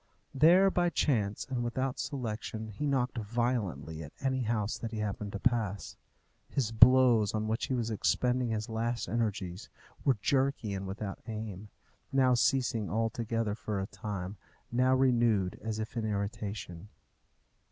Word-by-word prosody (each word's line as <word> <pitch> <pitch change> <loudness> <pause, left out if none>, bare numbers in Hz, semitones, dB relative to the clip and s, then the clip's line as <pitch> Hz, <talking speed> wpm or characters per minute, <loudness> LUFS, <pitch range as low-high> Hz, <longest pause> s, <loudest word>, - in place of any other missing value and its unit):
There, 175 +7 +6
by 175 -1 +2
chance 110 -10 0
and 125 -3 -2
without 130 +2 -2
selection, 110 -4 -4
he 110 +8 -3
knocked 130 -3 0
violently 105 - -2
at 75 -2 -9
any 130 -1 0
house 110 -2 0
that 115 - -4
he 110 - -6
happened 105 -1 -3
to 100 - -3
pass. 110 -5 0 0.5
His 125 -5 -1
blows, 120 -2 +6
on 110 0 -1
which 110 +2 -1
he 130 - 0
was 115 -2 -1
expending 125 +3 +1
his 110 -1 -2
last 115 +1 -2
energies, 100 -3 -2 0.3
were 135 -5 +3
jerky 130 -3 +1
and 95 0 -4
without 100 +1 -5
aim; 105 -2 -6 0.4
now 130 -2 +4
ceasing 120 -3 +1
altogether 115 0 -1
for 105 -1 -3
a 95 - -2
time, 100 -1 -5 0.3
now 130 +2 +3
renewed 120 -7 +2
as 110 -1 -2
if 110 +2 -5
in 115 - -1
irritation. 100 -3 -4
115 Hz, 150 wpm, -31 LUFS, 105-125 Hz, 0.5 s, There